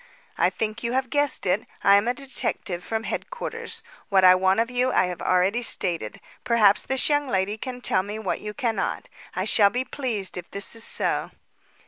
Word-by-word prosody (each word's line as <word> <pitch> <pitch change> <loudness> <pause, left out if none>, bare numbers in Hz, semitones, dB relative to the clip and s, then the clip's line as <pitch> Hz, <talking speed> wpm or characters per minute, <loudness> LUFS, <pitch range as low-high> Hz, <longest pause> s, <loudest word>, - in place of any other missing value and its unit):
"I - - +3
think 220 0 -4
you 235 0 -2
have 260 -1 -1
guessed 290 -5 +1
it. 195 +4 0 0.2
I 200 - +6
am 200 +3 +3
a 245 - 0
detective 245 -9 -2
from 225 0 -3
Headquarters. - - -5 0.3
What 195 -2 +4
I 185 0 +9
want 190 +2 +2
of 230 +2 0
you 250 +1 +1
I - - +3
have 180 -1 -5
already 185 +6 +2
stated. 170 - -2 0.2
Perhaps 225 -5 +4
this 265 -1 +1
young 290 -1 +1
lady 195 -3 0
can 250 +3 -7
tell 185 - +2
me 205 +3 -6
what 220 -3 -3
you 210 0 -6
cannot. 235 -5 -2 0.3
I - - -1
shall 205 -3 +5
be 250 +5 -2
pleased 225 -10 -4
if 180 - -7
this 200 +3 -3
is 225 - -4
so." - - +1
220 Hz, 195 wpm, -24 LUFS, 190-250 Hz, 0.3 s, I